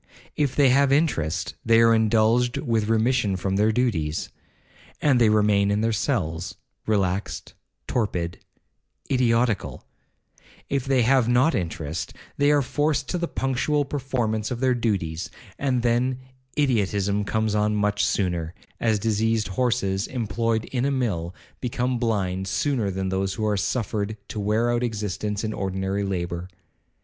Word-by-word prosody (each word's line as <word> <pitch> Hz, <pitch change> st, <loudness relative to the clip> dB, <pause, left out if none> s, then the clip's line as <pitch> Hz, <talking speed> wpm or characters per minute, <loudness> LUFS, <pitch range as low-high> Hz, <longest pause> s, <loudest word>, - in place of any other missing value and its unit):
If 140 Hz, -3 st, 0 dB
they 140 Hz, -3 st, +5 dB
have 135 Hz, +2 st, +4 dB
interest, 95 Hz, -, +1 dB
they 115 Hz, 0 st, +5 dB
are 115 Hz, 0 st, +6 dB
indulged 115 Hz, +2 st, +3 dB
with 115 Hz, -5 st, 0 dB
remission 110 Hz, -2 st, +2 dB
from 95 Hz, +1 st, -2 dB
their 105 Hz, +2 st, +3 dB
duties, 90 Hz, -11 st, -1 dB, 0.7 s
and 135 Hz, -5 st, +3 dB
they 115 Hz, -, +6 dB
remain 105 Hz, -2 st, +3 dB
in 100 Hz, +1 st, +1 dB
their 115 Hz, 0 st, +1 dB
cells, 90 Hz, -, -2 dB, 0.3 s
relaxed,—torpid,—idiotical; 105 Hz, -, -2 dB, 0.8 s
if 135 Hz, -2 st, -1 dB
they 135 Hz, -2 st, +3 dB
have 125 Hz, 0 st, +3 dB
not 125 Hz, +6 st, +3 dB
interest, 80 Hz, -5 st, -3 dB, 0.2 s
they 145 Hz, 0 st, +3 dB
are 145 Hz, -1 st, +4 dB
forced 145 Hz, +1 st, 0 dB
to 180 Hz, -, -1 dB
the 170 Hz, -, -1 dB
punctual 135 Hz, +2 st, 0 dB
performance 125 Hz, -6 st, -2 dB
of 125 Hz, -2 st, -4 dB
their 130 Hz, 0 st, +3 dB
duties, 95 Hz, -9 st, -2 dB, 0.3 s
and 130 Hz, -4 st, 0 dB
then 125 Hz, +2 st, +1 dB, 0.4 s
idiotism 105 Hz, -7 st, +1 dB
comes 110 Hz, +1 st, 0 dB
on 105 Hz, 0 st, +1 dB
much 105 Hz, 0 st, +1 dB
sooner, 85 Hz, -4 st, -1 dB, 0.2 s
as 110 Hz, -2 st, +2 dB
diseased 110 Hz, 0 st, 0 dB
horses, 100 Hz, -3 st, 0 dB
employed 115 Hz, -1 st, -1 dB
in 125 Hz, -2 st, -2 dB
a 140 Hz, -, +2 dB
mill, 100 Hz, -10 st, -2 dB, 0.2 s
become 125 Hz, 0 st, -1 dB
blind 95 Hz, -5 st, -1 dB
sooner 120 Hz, 0 st, 0 dB
than 95 Hz, 0 st, -2 dB
those 95 Hz, 0 st, -1 dB
who 110 Hz, -, -2 dB
are 105 Hz, -1 st, +1 dB
suffered 105 Hz, +1 st, -2 dB
to 105 Hz, -, -5 dB
wear 110 Hz, +4 st, +1 dB
out 120 Hz, 0 st, 0 dB
existence 105 Hz, -2 st, -2 dB
in 110 Hz, 0 st, -2 dB
ordinary 95 Hz, 0 st, -2 dB
labour. 90 Hz, -2 st, -3 dB
110 Hz, 140 wpm, -24 LUFS, 100-125 Hz, 0.8 s, are